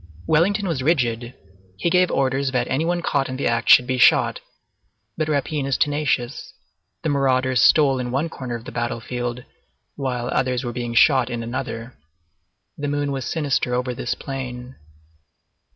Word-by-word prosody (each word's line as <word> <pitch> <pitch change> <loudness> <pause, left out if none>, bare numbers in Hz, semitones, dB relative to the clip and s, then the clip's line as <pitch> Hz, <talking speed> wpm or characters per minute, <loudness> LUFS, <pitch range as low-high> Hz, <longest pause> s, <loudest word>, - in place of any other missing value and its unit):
Wellington 195 +6 +2
was 160 -7 -1
rigid; 125 -5 0 0.4
he 170 - 0
gave 180 0 +4
orders 135 0 0
that 125 -1 0
any 135 +5 0
one 175 +1 -1
caught 140 -4 0
in 130 - -4
the 140 - -3
act 115 -1 0
should 125 - +8
be 130 0 -2
shot; - - +4 0.8
but 155 - -1
rapine 145 -1 -1
is 135 - 0
tenacious. 145 -4 -1 0.5
The 160 - 0
marauders 130 -2 +2
stole 140 -4 +5
in 125 -1 -3
one 135 +6 -1
corner 130 -6 -6
of 115 0 -8
the - - -7
battlefield 120 +1 -4 0.5
while 125 -3 -3
others 130 -1 0
were 120 -1 -4
being 120 -1 -4
shot 130 0 +5
in 120 -2 -4
another. 115 - -5 0.8
The 145 - -2
moon 145 0 -1
was 135 -3 -3
sinister 140 -4 0
over 125 0 -1
this 120 - -3
plain. 125 -2 -7
130 Hz, 165 wpm, -22 LUFS, 125-145 Hz, 0.8 s, should